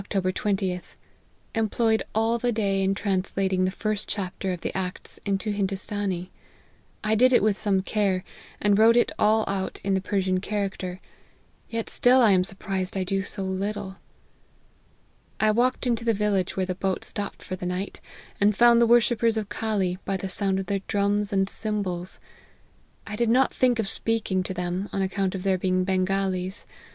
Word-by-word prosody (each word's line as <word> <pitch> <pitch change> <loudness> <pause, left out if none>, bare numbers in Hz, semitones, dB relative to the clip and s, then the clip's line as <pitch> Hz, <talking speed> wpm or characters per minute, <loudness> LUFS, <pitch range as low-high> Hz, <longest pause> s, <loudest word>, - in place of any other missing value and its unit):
20th. 190 -1 -1 0.6
Employed 225 0 +1
all 225 +2 +2
the 245 +1 +1
day 200 -3 0
in 195 0 +1
translat 195 -1 -1
ing 185 0 +2
the - - +1
first 215 +2 -3
chapter 190 -1 -3
of 180 -2 -4
the - - -4
Acts 185 -1 -5
into 200 +2 0
Hindoostanee. 195 -2 -1 0.7
I 215 0 +1
did 250 +4 +5
it 245 - +4
with 215 -2 +3
some 195 -3 +1
care, 195 -3 0 0.4
and 205 0 +3
wrote 230 +2 +6
it 240 - +3
all 215 +1 +4
out 195 -1 -2
in 195 - +1
the 190 - +1
Persian 185 -1 0
character; 190 -2 -3 0.7
yet 230 -1 -3
still 250 +1 +4
I 230 -4 +6
am 185 -1 +4
surprised 190 0 -3
I 190 - 0
do 195 +1 -1
so 195 0 -4
little. 190 +1 -3 1.4
I 215 0 +4
walked 250 +4 +1
into 235 -2 0
the 230 -1 +2
village 200 -3 0
where 190 - +1
the 185 - -2
boat 190 +1 -2
stopped 205 -1 -5
for 185 - -4
the 180 -1 -5
night, 180 +2 -4 0.4
and 205 0 +3
found 235 0 +6
the 235 - +5
worshippers 235 -1 +4
of 210 -2 -3
Call 215 -4 -1 0.2
by 195 - -1
the 190 0 -5
sound 195 0 0
of 195 - -3
their 195 +1 -1
drums 205 +1 +1
and 195 -1 +2
cymbals. 195 -4 -2 0.9
I 210 - -5
did 235 +1 +1
not 255 +3 +3
think 250 -2 +2
of 220 -3 -1
speaking 220 -3 0
to 190 - -4
them, 180 +2 -3
on 195 - -1
account 190 0 -1
of 185 - -5
their 190 -2 +1
being 185 0 +1
Bengalees. 190 0 -1
195 Hz, 180 wpm, -25 LUFS, 190-215 Hz, 1.4 s, wrote